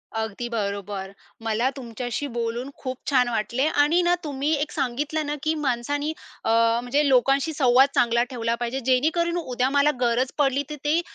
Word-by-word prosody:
अगदी 220 Hz, +1 st, -3 dB
बरोबर. 200 Hz, -3 st, -3 dB, 0.3 s
मला 225 Hz, +3 st, +1 dB
तुमच्याशी 245 Hz, +2 st, -4 dB
बोलून 235 Hz, +1 st, -3 dB
खूप 255 Hz, -1 st, -5 dB
छान 255 Hz, -3 st, +3 dB
वाटले 240 Hz, +4 st, 0 dB
आणि 310 Hz, +3 st, +3 dB
ना 350 Hz, 0 st, +3 dB
तुम्ही 285 Hz, 0 st, -2 dB
एक 295 Hz, +1 st, -2 dB
सांगितलं 295 Hz, +5 st, -2 dB
ना, 295 Hz, +1 st, -2 dB
की 310 Hz, -, +1 dB
माणसानी 290 Hz, +2 st, -1 dB, 0.3 s
अ, -, -, -1 dB, 0.3 s
म्हणजे 280 Hz, +4 st, +1 dB
लोकांशी 275 Hz, +4 st, +3 dB
संवाद 265 Hz, -1 st, +5 dB
चांगला 235 Hz, 0 st, +3 dB
ठेवला 235 Hz, -2 st, -1 dB
पाहिजे, 240 Hz, +2 st, -2 dB
जेणेकरून 320 Hz, +7 st, +2 dB
उद्या 255 Hz, -5 st, -1 dB
मला 285 Hz, +1 st, +3 dB
गरज 245 Hz, +2 st, +1 dB
पडली 280 Hz, -1 st, +2 dB
तर 300 Hz, -, -4 dB
ते, 310 Hz, +3 st, +3 dB
260 Hz, 160 wpm, -24 LUFS, 235-290 Hz, 0.3 s, संवाद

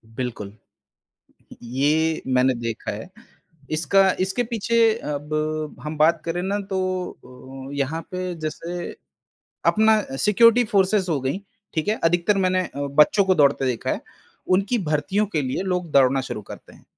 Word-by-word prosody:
बिल्कुल, 110 Hz, -5 st, -5 dB, 1.1 s
ये 150 Hz, +6 st, +1 dB
मैंने 130 Hz, 0 st, +3 dB
देखा 115 Hz, -2 st, -4 dB
है। 110 Hz, -, -7 dB, 0.6 s
इसका 190 Hz, +5 st, +3 dB
इसके 190 Hz, +6 st, 0 dB
पीछे 230 Hz, 0 st, -1 dB, 0.4 s
अब 155 Hz, +1 st, -3 dB
हम 150 Hz, 0 st, -5 dB
बात 155 Hz, +1 st, +3 dB
करें 170 Hz, +1 st, -2 dB
ना 200 Hz, +2 st, -1 dB
तो 190 Hz, -, 0 dB, 0.9 s
अ, -, -, -7 dB
यहाँ 145 Hz, +4 st, -1 dB
पे 180 Hz, -1 st, -3 dB
जैसे 170 Hz, +3 st, -5 dB, 0.7 s
अपना 220 Hz, 0 st, +4 dB, 0.2 s
सिक्योरिटी 230 Hz, -, +5 dB
फोर्सेस 195 Hz, -1 st, +2 dB
हो 150 Hz, -, +1 dB
गई, 135 Hz, +8 st, -1 dB, 0.4 s
ठीक 160 Hz, +4 st, -2 dB
है। 215 Hz, -, +2 dB
अधिकतर 175 Hz, +4 st, +2 dB
मैंने 185 Hz, -1 st, +1 dB
बच्चों 145 Hz, +8 st, +3 dB
को 185 Hz, -1 st, +3 dB
दौड़ते 140 Hz, -2 st, +3 dB
देखा 125 Hz, -3 st, -1 dB
है -, -, -3 dB, 0.5 s
उनकी 200 Hz, +6 st, 0 dB
भर्तियों 190 Hz, +8 st, 0 dB
के 160 Hz, -6 st, -1 dB
लिए 130 Hz, +5 st, -2 dB
लोग 180 Hz, -3 st, -2 dB
दौड़ना 135 Hz, -1 st, +4 dB
शुरू 120 Hz, -4 st, -6 dB
करते -, -, -12 dB
हैं। -, -, -20 dB
160 Hz, 145 wpm, -23 LUFS, 140-190 Hz, 1.1 s, सिक्योरिटी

